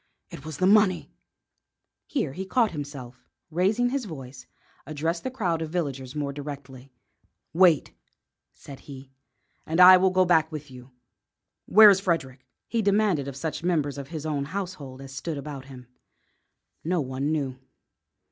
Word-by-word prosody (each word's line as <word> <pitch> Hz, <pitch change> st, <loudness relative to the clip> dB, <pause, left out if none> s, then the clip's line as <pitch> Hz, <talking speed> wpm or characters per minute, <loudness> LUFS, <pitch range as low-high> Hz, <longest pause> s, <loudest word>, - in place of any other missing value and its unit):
It -, -, -10 dB
was 155 Hz, -2 st, -7 dB
the 185 Hz, -, +1 dB
money 200 Hz, -2 st, +3 dB, 0.5 s
" -, -, -59 dB
Here 160 Hz, -, -2 dB
he 190 Hz, -, -5 dB
caught 225 Hz, +4 st, +1 dB
himself 145 Hz, -5 st, -7 dB
up, -, -, -35 dB, 0.3 s
and, 160 Hz, -, -11 dB
raising 215 Hz, +7 st, +2 dB
his 270 Hz, -3 st, -2 dB
voice, 135 Hz, -7 st, -10 dB, 0.4 s
addressed 160 Hz, +3 st, -2 dB
the -, -, -2 dB
crowd 185 Hz, -11 st, -2 dB
of 160 Hz, -, -4 dB
villagers 140 Hz, -6 st, -4 dB
more 145 Hz, -2 st, -3 dB
directly. 140 Hz, -2 st, -9 dB, 0.6 s
"Wait," 170 Hz, -3 st, +4 dB, 0.6 s
said 140 Hz, -2 st, -12 dB
he, 135 Hz, -1 st, -12 dB, 0.5 s
"and 165 Hz, +2 st, -2 dB
I 185 Hz, +1 st, +10 dB
will 190 Hz, +1 st, +3 dB
go 185 Hz, 0 st, +3 dB
back 165 Hz, -3 st, +3 dB
with 150 Hz, -3 st, -8 dB
you. 125 Hz, 0 st, -12 dB, 0.8 s
Where 215 Hz, +1 st, +9 dB
is 190 Hz, -, +2 dB
Frederick?" 140 Hz, -9 st, -2 dB, 0.2 s
he 230 Hz, -, 0 dB
demanded 200 Hz, -8 st, +1 dB
of 140 Hz, -, -6 dB
such 155 Hz, +3 st, -4 dB
members 150 Hz, -5 st, 0 dB
of 140 Hz, -, -7 dB
his 155 Hz, -1 st, -7 dB
own 145 Hz, -3 st, -2 dB
household 165 Hz, -7 st, -6 dB
as 135 Hz, -1 st, -10 dB
stood 155 Hz, +3 st, -5 dB
about 140 Hz, -2 st, -7 dB
him. 130 Hz, -2 st, -12 dB, 1.0 s
No 175 Hz, +2 st, 0 dB
one 135 Hz, +1 st, -2 dB
knew. 135 Hz, -4 st, -2 dB
155 Hz, 165 wpm, -26 LUFS, 135-185 Hz, 1.0 s, I